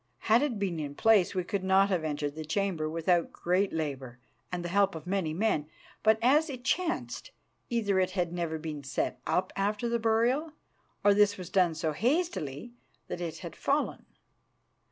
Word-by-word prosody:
Had 230 Hz, +3 st, +7 dB
it 280 Hz, -6 st, 0 dB
been 190 Hz, -5 st, -2 dB
in 145 Hz, -2 st, -5 dB
place, 210 Hz, -2 st, +4 dB
we 185 Hz, -, 0 dB
could 195 Hz, +1 st, -3 dB
not 190 Hz, +1 st, +4 dB
have 180 Hz, -5 st, 0 dB
entered 145 Hz, -2 st, -2 dB
the 155 Hz, +1 st, -6 dB
chamber 160 Hz, -1 st, -1 dB
without 165 Hz, +1 st, +1 dB
great 185 Hz, +3 st, 0 dB
labour 135 Hz, -6 st, -4 dB, 0.3 s
and 175 Hz, -1 st, -3 dB
the -, -, -3 dB
help 200 Hz, -1 st, +2 dB
of 160 Hz, -, -7 dB
many 180 Hz, -3 st, -1 dB
men; 160 Hz, -4 st, 0 dB, 0.3 s
but, 220 Hz, 0 st, +4 dB
as 300 Hz, +6 st, +4 dB
it 255 Hz, -3 st, -7 dB
chanced, 350 Hz, -, -1 dB, 0.4 s
either 210 Hz, -5 st, +1 dB
it 185 Hz, -, +2 dB
had 175 Hz, -1 st, 0 dB
never 170 Hz, -2 st, -2 dB
been 155 Hz, -2 st, -6 dB
set 135 Hz, -, -2 dB
up 185 Hz, +1 st, 0 dB
after 205 Hz, +4 st, 0 dB
the 235 Hz, 0 st, 0 dB
burial, 235 Hz, +8 st, +1 dB, 0.5 s
or 205 Hz, -, +6 dB
this 205 Hz, 0 st, +4 dB
was 180 Hz, -1 st, -8 dB
done 180 Hz, -4 st, +3 dB
so 160 Hz, 0 st, -1 dB
hastily 240 Hz, -, -1 dB, 0.4 s
that 175 Hz, -, -4 dB
it 170 Hz, -2 st, -4 dB
had -, -, -7 dB
fallen. -, -, -1 dB
185 Hz, 180 wpm, -29 LUFS, 160-220 Hz, 0.5 s, Had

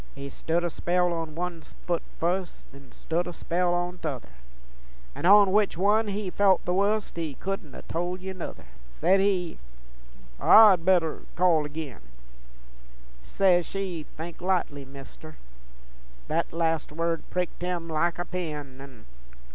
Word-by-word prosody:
He 140 Hz, 0 st, -7 dB
stood 170 Hz, +2 st, -1 dB
a 175 Hz, -, -1 dB
spell 180 Hz, +1 st, +1 dB
on 165 Hz, -2 st, -4 dB
one 175 Hz, -1 st, -4 dB
foot 170 Hz, +2 st, -4 dB, 0.2 s
fust, 180 Hz, +2 st, -2 dB
Then 140 Hz, 0 st, -15 dB
stood 170 Hz, +2 st, -2 dB
a 175 Hz, -, -5 dB
spell 175 Hz, +1 st, 0 dB
on 175 Hz, +1 st, -3 dB
t'other, 140 Hz, -6 st, -5 dB, 0.8 s
An' 170 Hz, -, -1 dB
on 200 Hz, 0 st, +7 dB
which 205 Hz, -4 st, +2 dB
one 210 Hz, +4 st, +3 dB
he 200 Hz, -2 st, -3 dB
felt 195 Hz, -2 st, +3 dB
the 180 Hz, -, 0 dB
wust 200 Hz, +1 st, 0 dB
He 160 Hz, -4 st, -3 dB
couldn't 190 Hz, -5 st, -5 dB
ha' -, -, -11 dB
told 175 Hz, +2 st, -2 dB
ye 190 Hz, +1 st, -6 dB
nuther. 185 Hz, -, -8 dB, 0.3 s
Says 190 Hz, -, +3 dB
he, 185 Hz, -4 st, 0 dB, 0.8 s
'I'd 205 Hz, -6 st, +7 dB
better 175 Hz, -3 st, +2 dB, 0.2 s
call 170 Hz, -4 st, +3 dB
agin:' 150 Hz, -5 st, -7 dB, 1.2 s
Says 180 Hz, -, +2 dB
she, 185 Hz, -5 st, -4 dB
'Think 165 Hz, +2 st, -7 dB
likely, 175 Hz, -7 st, -1 dB
Mister:' 140 Hz, +3 st, -12 dB, 0.9 s
Thet -, -, -1 dB
last 165 Hz, -2 st, -1 dB
word 165 Hz, +1 st, -1 dB
pricked 180 Hz, -1 st, -3 dB
him 175 Hz, -2 st, -3 dB
like 165 Hz, +1 st, 0 dB
a 175 Hz, -, -3 dB
pin, 150 Hz, -7 st, -5 dB
An'... 135 Hz, -5 st, -13 dB
175 Hz, 145 wpm, -27 LUFS, 160-185 Hz, 1.2 s, on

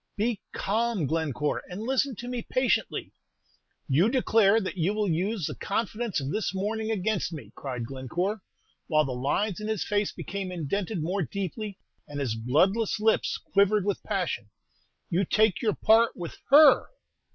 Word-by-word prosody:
"Be 220 Hz, 0 st, 0 dB
calm, 220 Hz, -3 st, 0 dB
Glencore, 150 Hz, -1 st, -1 dB
and 185 Hz, +4 st, -6 dB
listen 265 Hz, +1 st, 0 dB
to 245 Hz, -, -8 dB
me 245 Hz, -1 st, -3 dB
patiently." 255 Hz, +2 st, 0 dB, 0.7 s
"You 160 Hz, +10 st, +3 dB
declare 225 Hz, -4 st, +4 dB
that 190 Hz, -3 st, -4 dB
you 185 Hz, +4 st, 0 dB
will 210 Hz, -1 st, 0 dB
use 185 Hz, +2 st, 0 dB
the -, -, -3 dB
confidence 220 Hz, 0 st, -2 dB
of 135 Hz, 0 st, -4 dB
this 210 Hz, -1 st, -1 dB
morning 220 Hz, +3 st, -2 dB
against 215 Hz, -3 st, 0 dB
me!" 155 Hz, -3 st, -8 dB
cried 125 Hz, -4 st, -5 dB
Glencore, 175 Hz, -, -3 dB, 0.5 s
while 155 Hz, -2 st, +3 dB
the 135 Hz, -, -3 dB
lines 145 Hz, +11 st, -1 dB
in 215 Hz, -, -5 dB
his 220 Hz, -3 st, -1 dB
face 205 Hz, -1 st, 0 dB
became 195 Hz, -2 st, -5 dB
indented 180 Hz, +2 st, -2 dB
more 185 Hz, +5 st, -1 dB
deeply, 200 Hz, +3 st, -4 dB, 0.3 s
and 145 Hz, -1 st, -6 dB
his 130 Hz, -6 st, -1 dB
bloodless 180 Hz, -, +1 dB
lips 220 Hz, +1 st, +2 dB
quivered 200 Hz, 0 st, +2 dB
with 200 Hz, -2 st, -1 dB
passion. 180 Hz, -, -2 dB, 0.6 s
"You 180 Hz, +3 st, +2 dB
take 210 Hz, 0 st, +2 dB
your 215 Hz, -3 st, +1 dB
part 225 Hz, +1 st, +4 dB
with 170 Hz, -2 st, -6 dB, 0.2 s
_her! 290 Hz, -2 st, +8 dB
200 Hz, 160 wpm, -27 LUFS, 165-220 Hz, 0.7 s, her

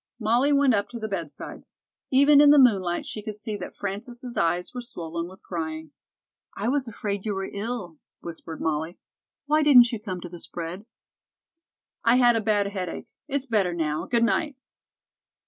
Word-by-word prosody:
Molly 240 Hz, +6 st, +2 dB
went 280 Hz, -3 st, +4 dB
up 200 Hz, -1 st, 0 dB
to 240 Hz, -, -7 dB
the 220 Hz, -, -3 dB
bedside. 170 Hz, -8 st, -5 dB, 0.5 s
Even 280 Hz, +2 st, +6 dB
in 295 Hz, -, +7 dB
the 295 Hz, -, +7 dB
moonlight 195 Hz, -10 st, +3 dB
she 215 Hz, -, -6 dB
could 215 Hz, 0 st, -6 dB
see 210 Hz, 0 st, -5 dB
that -, -, -8 dB
Frances' 240 Hz, +5 st, -6 dB
eyes 175 Hz, +2 st, 0 dB
were 250 Hz, -, -4 dB
swollen 170 Hz, -7 st, -5 dB
with 190 Hz, +1 st, -15 dB
crying. 160 Hz, -3 st, -5 dB, 0.7 s
"I 210 Hz, +4 st, -1 dB
was 270 Hz, -1 st, 0 dB
afraid 205 Hz, -3 st, -4 dB
you 210 Hz, -2 st, -2 dB
were 195 Hz, 0 st, -4 dB
ill," 200 Hz, -6 st, -5 dB, 0.2 s
whispered 165 Hz, -1 st, -8 dB
Molly. 160 Hz, +2 st, -2 dB, 0.5 s
"Why 305 Hz, +2 st, +3 dB
didn't 250 Hz, -6 st, +7 dB
you 230 Hz, -, -3 dB
come 190 Hz, -4 st, -5 dB
to 175 Hz, -, -7 dB
the 175 Hz, 0 st, -10 dB
spread?" 175 Hz, +7 st, -7 dB, 1.2 s
"I 230 Hz, +1 st, +5 dB
had 245 Hz, -2 st, +5 dB
a 225 Hz, -, +1 dB
bad 210 Hz, -2 st, +2 dB
headache. 185 Hz, -4 st, -5 dB, 0.2 s
It's 280 Hz, -2 st, -1 dB
better 200 Hz, -8 st, +1 dB
now. 155 Hz, -1 st, -2 dB
Good 235 Hz, -1 st, +2 dB
night." 290 Hz, +5 st, +1 dB
210 Hz, 175 wpm, -25 LUFS, 175-245 Hz, 1.2 s, in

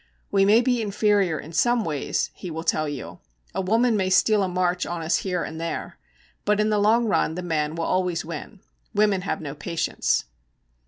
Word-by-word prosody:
'We 195 Hz, -1 st, +4 dB
may 215 Hz, +4 st, +6 dB
be 245 Hz, -1 st, +1 dB
inferior 205 Hz, -5 st, +1 dB
in 160 Hz, -, -10 dB
some 240 Hz, +6 st, +2 dB
ways,' 150 Hz, -4 st, -1 dB
he 180 Hz, -, -8 dB
will 160 Hz, 0 st, -5 dB
tell 155 Hz, -2 st, +1 dB
you. 145 Hz, -3 st, -7 dB, 0.3 s
'A -, -, -1 dB
woman 225 Hz, +5 st, +2 dB
may 190 Hz, -2 st, +1 dB
steal 210 Hz, +2 st, +4 dB
a 190 Hz, -, +1 dB
march 180 Hz, 0 st, 0 dB
on 170 Hz, -1 st, -4 dB
us 160 Hz, -, +2 dB
here 180 Hz, -3 st, -2 dB
and 160 Hz, +1 st, -6 dB
there, 165 Hz, -, -4 dB, 0.4 s
but 210 Hz, 0 st, +2 dB
in 215 Hz, 0 st, +2 dB
the 210 Hz, -, +2 dB
long 225 Hz, +3 st, +4 dB
run 195 Hz, -6 st, +1 dB
the 180 Hz, -, -4 dB
man 155 Hz, -2 st, -1 dB
will 165 Hz, -, -2 dB
always 180 Hz, -3 st, 0 dB
win. 170 Hz, +5 st, -8 dB, 0.3 s
Women 205 Hz, -2 st, +3 dB
have 180 Hz, -4 st, -3 dB
no 145 Hz, -3 st, -5 dB
patience.' 165 Hz, +3 st, -1 dB
185 Hz, 200 wpm, -24 LUFS, 165-210 Hz, 0.4 s, may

